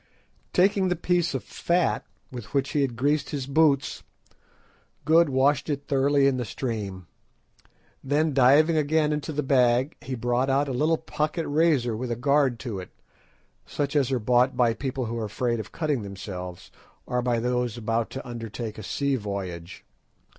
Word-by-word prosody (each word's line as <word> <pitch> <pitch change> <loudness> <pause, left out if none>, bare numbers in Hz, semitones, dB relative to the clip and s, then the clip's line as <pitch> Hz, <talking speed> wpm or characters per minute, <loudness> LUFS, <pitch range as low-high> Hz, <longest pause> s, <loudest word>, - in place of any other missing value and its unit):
Taking 195 +1 +3
the 180 - +1
piece 175 -2 0
of 130 - -3
fat 175 0 0 0.3
with 120 +1 -8
which 140 0 +1
he 150 - +1
had 130 -4 -1
greased 145 +4 0
his 140 -3 -3
boots, 140 -1 +2 1.0
Good 160 +1 +5
washed 140 +3 +2
it 140 -1 -2
thoroughly 140 0 +2
in 135 -2 +3
the 125 - -1
stream. 105 -6 -4 1.0
Then 150 +3 +1
diving 145 +5 +5
again 155 0 +2
into 150 +1 -3
the 150 0 -2
bag 130 +1 +2
he 130 +1 -4
brought 120 +2 0
out 140 +2 +2
a - - -3
little 155 +6 +2
pocket 155 +1 -3
razor 145 -6 +2
with 125 +3 -4
a 120 - -1
guard 140 0 +2
to 110 -7 -4
it, 90 - -9 0.8
such 145 0 -3
as 135 -3 +2
are 130 - +2
bought 125 +3 +2
by 120 -2 +3
people 130 +2 -3
who 115 +1 -4
are 110 - -2
afraid 120 +3 -1
of 110 - -7
cutting 150 -6 -1
themselves, 95 -3 -7 0.3
or 125 0 -1
by 120 -1 0
those 125 -1 -1
about 115 0 -1
to 135 - -7
undertake 115 -2 -6
a - - -7
sea 140 +6 -1
voyage. 95 -5 -6
130 Hz, 170 wpm, -26 LUFS, 120-145 Hz, 1.0 s, Good